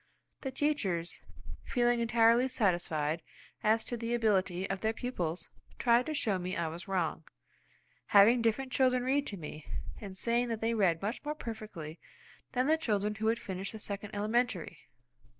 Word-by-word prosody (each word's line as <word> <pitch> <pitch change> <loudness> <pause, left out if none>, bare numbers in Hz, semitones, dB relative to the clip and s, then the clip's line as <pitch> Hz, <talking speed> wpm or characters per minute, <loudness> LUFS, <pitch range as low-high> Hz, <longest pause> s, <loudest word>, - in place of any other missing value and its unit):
The 265 - -3
teachers, 210 - -1 0.4
feeling 240 -1 +2
entirely 235 +2 +4
satisfied 170 - 0 0.4
as 220 +1 +3
to 240 - -3
the 235 0 -1
ability 195 -5 +1
of 195 -1 -3
their 220 0 +1
pupils, 180 -9 -3 0.3
tried 240 0 +3
to 310 - -2
show 205 -9 +1
me 180 +1 -3
I 170 -1 0
was 170 +2 -8
wrong, 175 -4 -1 0.8
having 225 +4 +7
different 245 +4 0
children 255 -1 +3
read 275 +3 +1
to 200 - -4
me, 150 -2 -8 0.3
and 195 -4 -8
saying 235 +3 +1
that 225 -2 -2
they 225 +1 +1
read 190 -6 +2
much 215 +7 -2
more 300 +1 -3
perfectly 215 - -7 0.5
than 255 0 +2
the 315 +3 +4
children 210 -8 0
who 220 +1 -2
had 225 +1 +3
finished 195 -2 -5
the 220 - -7
second 205 0 -6
elementary. 215 -3 0
220 Hz, 165 wpm, -32 LUFS, 185-240 Hz, 0.8 s, having